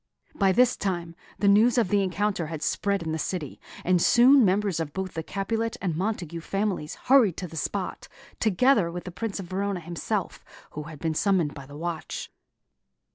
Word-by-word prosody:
By 195 -2 +3
this 250 +5 +4
time, 175 -4 -3 0.2
the 200 - +1
news 220 +5 +5
of 225 -6 +2
the 205 0 +3
encounter 190 -2 -1
had 155 -1 -5
spread 200 -2 0
in 160 - -3
the 160 - -2
city, 155 -3 -4 0.2
and 180 -1 +3
soon 255 +6 +6
members 195 -2 +1
of 155 -3 -4
both 190 -1 -4
the 160 - -3
Capulet 225 +6 -2
and 175 -5 -2
Montague 175 -3 -3
families 195 -4 -2
hurried 245 - +5
to 180 - -4
the 165 - -11
spot, - - -3 0.3
together 220 -2 +3
with 175 +1 -6
the 180 - -7
Prince 210 +2 -4
of 195 - -5
Verona 195 +1 -2
himself, 170 0 -4 0.3
who 150 0 -6
had 155 - -9
been 160 +2 -1
summoned 175 -4 +1
by 140 -2 -10
the 145 +1 -10
watch. 170 0 -5
185 Hz, 185 wpm, -26 LUFS, 165-205 Hz, 0.3 s, soon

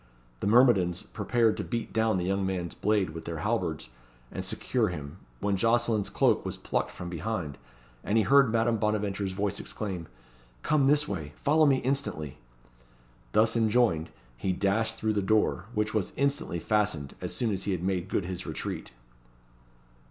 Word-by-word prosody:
The - - -1
myrmidons 105 -7 +4
prepared 115 -2 +1
to - - -2
beat 115 -2 -4
down 110 -2 +2
the 90 - -1
young 95 +1 0
man's 90 -3 -2
blade 100 -5 +1
with 80 +1 -8
their 85 -1 -4
halberds, 90 - -1 0.4
and - - -4
secure - - 0
him, 75 +3 -6 0.2
when 100 -1 +1
Jocelyn's 115 0 +2
cloak - - +2
was - - -4
plucked - - -1
from 90 - -8
behind, 85 -3 -4 0.4
and 105 - +1
he 110 - +4
heard 135 +1 +5
Madame 115 0 +2
Bonaventure's 105 -2 -1
voice 100 0 -1
exclaim 95 -6 -5 0.6
"Come 150 -3 +3
this 150 +1 +3
way! 80 -6 -5
follow 155 +2 +3
me 135 -2 +4
instantly!" 125 - -2 0.9
Thus 110 +2 +4
enjoined, 110 -8 +2 0.3
he 95 +9 -1
dashed 100 +4 +1
through 110 0 0
the 105 - +1
door, 100 -2 +2
which 105 +1 0
was 105 -5 -1
instantly 140 -10 0
fastened, 85 -7 0
as - - -4
soon 115 -3 0
as 95 -1 -2
he 100 - 0
had 90 -2 -2
made 95 0 -1
good 95 - 0
his 90 0 -5
retreat. - - -4
105 Hz, 165 wpm, -28 LUFS, 90-115 Hz, 0.9 s, heard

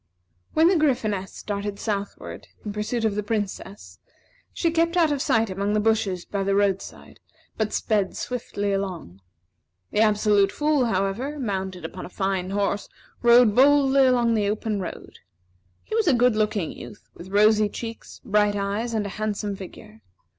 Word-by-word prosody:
When 320 +1 +5
the 365 0 +4
Gryphoness 215 -10 0
started 205 0 -5
southward, 200 -2 -5 0.2
in 205 - -4
pursuit 220 +2 -2
of 215 - +1
the 210 - -1
Princess, 205 -2 -5 0.5
she 335 - 0
kept 335 +1 +1
out 325 -3 +4
of 285 -2 -1
sight 225 -5 +1
among 200 +2 -1
the 215 - +2
bushes 210 -4 0
by 200 - -3
the 195 0 +1
roadside; 195 -1 -2 0.4
but 215 -1 -1
sped 205 -4 0
swiftly 205 -5 -3
along. 180 - -4 0.7
The - - 0
Absolute 210 -2 +3
Fool, 295 -3 +1
however, 225 +8 -1
mounted 190 - -4
upon - - -7
a - - -14
fine 190 -1 -2
horse, 200 0 -1 0.3
rode 235 -2 +6
boldly 275 +1 +5
along 245 -2 +3
upon - - +3
the 210 -2 +1
open 215 0 -2
road. 180 - -8 0.6
He - - -9
was 445 -3 +1
a 285 - +5
good 245 -1 +3
looking 210 -5 0
youth, 205 - -11
with 180 - -11
rosy 210 +1 +4
cheeks, 230 +2 -8
bright 210 0 +2
eyes, 205 +4 -2
and 210 -2 0
a - - -4
handsome 210 -1 -2
figure. 215 +3 -12
210 Hz, 165 wpm, -24 LUFS, 200-235 Hz, 0.7 s, rode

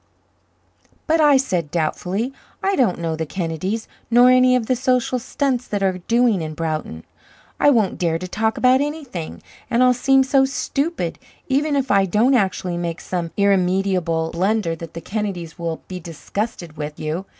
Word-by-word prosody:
"But," 320 0 +2
I 295 -2 +6
said 180 - -1
doubtfully, 180 - -2 0.3
"I 390 0 +2
don't 240 - +2
know 165 -1 -2
the 160 - -3
Kennedys 185 +6 -3 0.2
nor 245 +2 +6
any 255 0 +5
of 245 -3 0
the 255 - +1
social 255 0 +1
stunts 255 0 -1
that 205 -1 -2
are 185 -1 0
doing 230 0 +2
in 155 -1 -5
Broughton; 155 - -4 0.6
I - - +5
won't 225 -8 +2
dare 165 -2 +1
to 185 +2 -6
talk 220 +4 -1
about 255 +1 +4
anything, 285 - -5 0.3
and 245 0 +3
I'll 250 0 +5
seem 270 +2 +3
so 265 0 +3
stupid, 275 +5 -2 0.3
even 285 +2 +1
if 270 -4 0
I 195 -1 +4
don't 225 +9 +3
actually 190 -6 0
make 170 -1 -3
some 175 -2 -3
irremediable 185 -4 +1
blunder, 190 -1 0
that 165 0 -10
the 165 - -5
Kennedys 190 -6 -4
will 165 -1 -4
be 185 -1 -6
disgusted 175 0 -5
with 150 0 -6
you. 160 +5 -3
200 Hz, 170 wpm, -21 LUFS, 170-255 Hz, 0.6 s, I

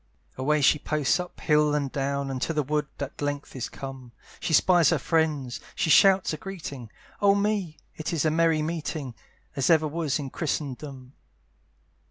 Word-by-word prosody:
Away 150 +3 +1
she 150 +2 +4
posts 150 +2 +1
up 180 0 -7
hill 150 -1 +3
and 140 -3 -1
down, 140 0 -2
And 130 -1 -4
to 165 - -1
the 150 -1 +1
wood 150 +1 -1
at 140 +1 -6
length 145 -1 -3
is 130 - -4
come, 135 -3 -9 0.3
She - - -3
spies 175 +1 +5
her - - +2
friends, 150 -6 0 0.2
she 160 - +1
shouts 190 +2 +5
a - - -3
greeting; 150 - -7 0.3
Oh 200 -1 +5
me! 200 -5 -1 0.2
it 155 - -4
is 165 -3 0
a 155 - +3
merry 165 -1 +2
meeting, 155 -4 -4 0.4
As 135 -3 +1
ever 160 -2 +4
was 155 -2 -1
in 140 -3 -6
Christendom. 140 -4 -4
150 Hz, 175 wpm, -26 LUFS, 140-165 Hz, 0.4 s, spies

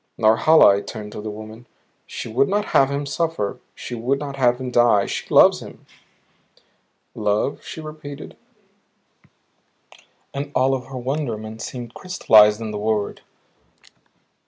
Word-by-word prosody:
"Norhala," 110 0 +5
I - - -3
turned 105 -1 -8
to 105 - -7
the 110 - -5
woman, 110 +3 -10 0.4
"she - - -6
would 130 +5 +1
not 205 +1 0
have 135 - +5
him 140 +1 -3
suffer; 140 -7 -2 0.2
she - - -8
would 120 +4 -1
not 140 -1 -6
have 125 -2 +2
him 130 -1 -5
die. 120 -5 +4
She - - -5
loves - - +6
him." - - -13 1.3
"Love?" 105 +5 -1
she 160 - -8
repeated, 155 -2 -9 2.0
and 140 +1 -5
all 130 +1 +3
of 130 -2 -3
her 130 -1 -7
wonderment 120 -5 -4
seemed 120 -1 -7
crystallized 105 -13 +4
in 110 -1 -5
the 105 - -5
word. 105 -1 -2
120 Hz, 140 wpm, -21 LUFS, 110-140 Hz, 2.0 s, loves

